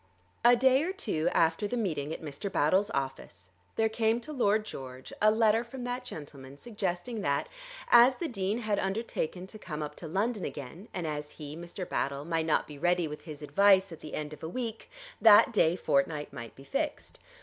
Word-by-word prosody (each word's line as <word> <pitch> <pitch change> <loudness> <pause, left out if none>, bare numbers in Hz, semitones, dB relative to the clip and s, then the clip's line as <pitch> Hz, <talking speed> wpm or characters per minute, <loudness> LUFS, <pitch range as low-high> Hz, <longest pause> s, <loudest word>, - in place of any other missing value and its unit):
A 240 +1 +7
day 260 +2 +4
or 345 +4 -1
two 205 - -1
after 165 +5 +2
the 245 - -2
meeting 155 -9 -2
at 160 - -6
Mr. 155 +7 -5
Battle's 185 +8 +2
office 130 - -5 0.2
there 225 - +3
came 220 +1 +1
to 305 +4 -8
Lord 215 -5 +2
George 130 -7 -8
a 215 - +6
letter 220 +1 +3
from 245 +1 -8
that 245 +1 -4
gentleman 140 -2 -9
suggesting 205 +2 -3
that, 140 -5 0 0.4
as 240 +2 +8
the 340 - -3
Dean 205 -4 -1
had 215 -2 0
undertaken 190 -3 -2
to 215 +3 -11
come 155 -6 -5
up 150 - -6
to 165 - -7
London 205 +5 -1
again, 145 - -7
and 180 -3 -4
as 150 -1 -4
he, 150 -1 -7
Mr. 175 +2 -7
Battle, 140 +1 -2
might 165 -1 -1
not 155 - +2
be 145 -2 -11
ready 175 +1 +2
with 150 0 -8
his 155 -2 -8
advice 195 +5 +4
at 165 - -9
the 155 - -7
end 150 0 -4
of - - -12
a 160 - -5
week, 230 +1 -5 0.3
that 225 +2 +8
day 170 -5 +4
fortnight 150 -2 0
might 115 -1 -8
be 135 - -13
fixed. 290 - -3
185 Hz, 200 wpm, -30 LUFS, 150-225 Hz, 0.4 s, as